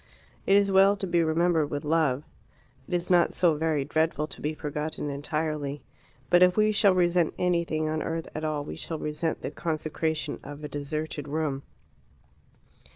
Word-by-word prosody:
It 195 Hz, -, +5 dB
is 200 Hz, -1 st, +4 dB
well 195 Hz, +1 st, +5 dB
to 195 Hz, -, -3 dB
be 170 Hz, -2 st, +2 dB
remembered 160 Hz, -1 st, +2 dB
with 145 Hz, 0 st, -4 dB
love. 150 Hz, -3 st, +1 dB, 0.6 s
It -, -, -7 dB
is 175 Hz, +1 st, -2 dB
not 175 Hz, -1 st, +4 dB
so 175 Hz, -3 st, +4 dB
very 155 Hz, -2 st, 0 dB
dreadful 155 Hz, +1 st, 0 dB
to -, -, -10 dB
be 155 Hz, +1 st, -2 dB
forgotten 150 Hz, 0 st, -3 dB
entirely. 145 Hz, 0 st, -3 dB, 0.5 s
But 175 Hz, -, +6 dB
if 180 Hz, +1 st, +5 dB
we 215 Hz, 0 st, +4 dB
shall 200 Hz, -2 st, +4 dB
resent 175 Hz, -2 st, +2 dB
anything 170 Hz, -3 st, 0 dB
on 155 Hz, 0 st, -1 dB
earth 165 Hz, 0 st, -3 dB
at 155 Hz, -, -5 dB
all, 155 Hz, -2 st, -1 dB
we -, -, -7 dB
shall 165 Hz, -, -4 dB
resent 150 Hz, +2 st, -3 dB
the -, -, -3 dB
consecration 160 Hz, -1 st, -2 dB
of 145 Hz, +1 st, -9 dB
a -, -, -3 dB
deserted 145 Hz, 0 st, -4 dB
room. 145 Hz, -2 st, -2 dB
155 Hz, 170 wpm, -27 LUFS, 150-175 Hz, 0.6 s, But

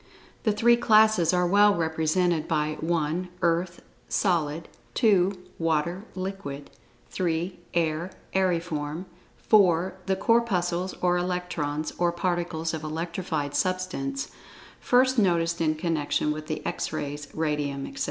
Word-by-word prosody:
The 215 Hz, -, +4 dB
three 235 Hz, +3 st, +4 dB
classes 215 Hz, -6 st, +5 dB
are 180 Hz, -1 st, +2 dB
well 205 Hz, +3 st, +5 dB
represented 160 Hz, 0 st, +1 dB
by 155 Hz, -2 st, 0 dB
(1) 165 Hz, +2 st, -1 dB
Earth 170 Hz, +1 st, 0 dB, 0.3 s
(solid); 165 Hz, -4 st, 0 dB, 0.3 s
(2) 195 Hz, -6 st, +4 dB, 0.3 s
Water 165 Hz, +4 st, 0 dB
(liquid); 185 Hz, -7 st, -5 dB, 0.4 s
(3) 175 Hz, +1 st, -2 dB, 0.2 s
Air 165 Hz, +1 st, 0 dB, 0.2 s
(aeriform); 170 Hz, -3 st, -1 dB, 0.4 s
(4) 185 Hz, -4 st, +4 dB
The 190 Hz, -, +2 dB
Corpuscles 190 Hz, -5 st, +1 dB
or 180 Hz, 0 st, +3 dB
Electrons, 175 Hz, -4 st, -2 dB
or 175 Hz, -1 st, +3 dB
particles 170 Hz, -2 st, -2 dB
of 160 Hz, -1 st, -4 dB
electrified 160 Hz, -2 st, -3 dB
substance, 180 Hz, -8 st, -2 dB, 0.5 s
first 255 Hz, 0 st, +3 dB
noticed 170 Hz, -4 st, +2 dB
in 155 Hz, -1 st, +2 dB
connection 155 Hz, -2 st, 0 dB
with 155 Hz, 0 st, -5 dB
the 155 Hz, -, -4 dB
X 175 Hz, -, -2 dB
Rays, 145 Hz, 0 st, -4 dB
Radium, 150 Hz, -3 st, -1 dB
etc. 275 Hz, -, -9 dB
170 Hz, 120 wpm, -26 LUFS, 155-185 Hz, 0.5 s, classes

